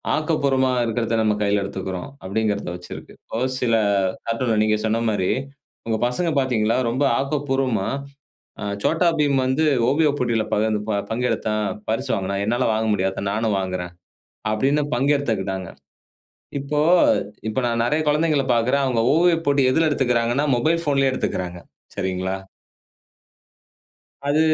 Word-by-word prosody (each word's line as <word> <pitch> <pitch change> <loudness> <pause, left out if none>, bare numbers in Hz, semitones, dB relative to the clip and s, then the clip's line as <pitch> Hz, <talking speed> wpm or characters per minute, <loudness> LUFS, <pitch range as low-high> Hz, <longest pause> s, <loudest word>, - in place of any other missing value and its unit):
ஆக்கப்பூர்வமா 140 -4 +1
இருக்கிறத 115 0 -1
நம்ம 105 -1 +2
கையில 100 0 +2
எடுத்துக்கிறோம், 95 +3 -5
அப்படிங்கிறத 100 -1 -1
வச்சு 90 0 -11
இருக்கு. - - -11 0.3
ஒரு 130 +1 0
சில 115 -2 +2 0.5
கார்ட்டூன்ல 115 -1 0
நீங்க 110 0 +2
சொன்ன 115 +1 0
மாரி 95 -3 0 0.6
உங்க 110 -1 0
பசங்க 165 +8 -1
பாத்தீங்களா 115 -4 +1
ரொம்ப 130 +5 0 0.2
ஆக்கப்பூர்வமா, 135 -6 0 0.8
அ - - -3 0.2
"சோட்டா 165 +2 +2
பீம் 145 -2 +2
வந்து 130 +5 +1 0.2
ஓவிய 150 +2 +3
போட்டியில 115 -3 0
பகிர்ந் 110 +1 +1
ப 105 -2 +1
பங்கெடுத்தான், 110 -2 -1 0.2
பரிசு 125 +4 -1
வாங்குனான். 100 -1 -2
என்னால 120 +3 +1
வாங்க 110 +1 0
முடியாதா? 95 0 -1
நானும் 110 -1 0
வாங்குறேன்" 90 -2 -4 0.6
அப்படீன்னு 140 +7 +1
பங்கெடுத்துக்கிட்டாங்க. 110 -10 0 0.9
இப்போ 150 +2 -1 0.7
இப்ப 130 - -1
நான் 115 0 0
நெறையா 150 +5 +1
குழந்தைங்கள 150 -2 +2
பாக்குறேன். 125 +4 +2
அவுங்க 125 -3 +1
ஓவியப் 165 -1 +3
போட்டி 140 -1 +3
எதுல 160 +2 +3
எடுத்துக்கிறாங்கன்னா, 125 0 +1
மொபைல் 165 +5 +1
ஃபோன்லயே 135 -3 +2
எடுத்துக்கிறாங்க, 90 -7 -3 0.4
சரிங்களா? 95 -1 -2 1.9
அது 150 +2 +3
120 Hz, 130 wpm, -22 LUFS, 105-140 Hz, 1.9 s, ஓவிய